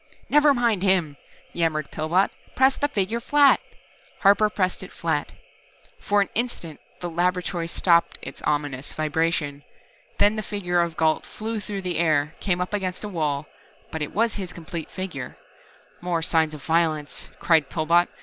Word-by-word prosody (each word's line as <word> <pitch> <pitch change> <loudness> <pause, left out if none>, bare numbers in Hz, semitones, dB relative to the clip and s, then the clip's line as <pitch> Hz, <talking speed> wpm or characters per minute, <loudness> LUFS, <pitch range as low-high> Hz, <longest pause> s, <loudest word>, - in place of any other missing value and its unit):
"Never 295 0 +6
mind 235 -7 +2
him," 185 -7 +2 0.4
yammered 155 -3 0
Pillbot. 165 +5 +1 0.2
"Press 265 +1 +4
the 290 - +1
figure 220 -3 -1
flat!" 285 +3 +5 0.6
Harper 205 +2 +5
pressed 185 -3 -1
it - - -9
flat. - - -2 0.7
For 205 0 +2
an 200 - 0
instant 215 -10 -3 0.2
the 175 - -2
laboratory 175 0 -1
stopped 170 0 +2
its 135 - -9
ominous 145 -2 -2
vibration. 155 -2 -1 0.6
Then 210 +2 +4
the - - 0
figure 180 -5 0
of 170 -2 -2
Gault 160 -1 +2
flew 220 +1 -4
through 200 -1 -5
the 175 -3 -1
air, 155 -2 +2
came 180 -3 0
up 180 +3 -3
against 185 -2 -2
a 210 - -4
wall 150 -5 -1 0.5
but 160 - -4
it 150 - -3
was 230 +1 +1
his 180 -2 -6
complete 165 -1 -7
figure. 185 -9 -6 0.6
"More 175 -2 -1
signs 160 -2 +2
of 145 - -11
violence," 160 -3 0
cried 160 -5 +3
Pillbot. 170 +2 +3
175 Hz, 160 wpm, -24 LUFS, 155-200 Hz, 0.7 s, Never